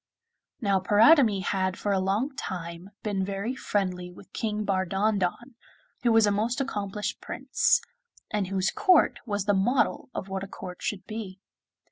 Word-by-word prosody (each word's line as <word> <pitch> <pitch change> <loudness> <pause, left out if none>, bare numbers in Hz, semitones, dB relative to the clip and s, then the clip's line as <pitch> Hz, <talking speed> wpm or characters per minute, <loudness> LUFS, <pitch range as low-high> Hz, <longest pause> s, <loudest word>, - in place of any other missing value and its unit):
Now 200 -3 +2
Paridamie 215 - +5
had 190 0 0
for 205 - -1
a 195 - +2
long 210 +9 0
time 170 -2 -6
been 200 -3 -1
very 200 +5 -2
friendly 185 -6 -2
with 180 +2 -16
King 215 -1 -2
Bardondon, 195 +4 0 0.5
who 240 - +3
was 225 -1 +6
a 205 - +2
most 225 +6 0
accomplished 210 -6 -3
Prince, - - +1 0.5
and 210 -3 0
whose 190 0 0
court 365 -3 +4
was 205 -2 -1
the 205 - +3
model 240 +9 +1
of - - -4
what 190 0 -4
a - - -6
court 180 -2 -9
should 195 -3 -3
be. 210 -4 -6
200 Hz, 155 wpm, -27 LUFS, 190-220 Hz, 0.5 s, was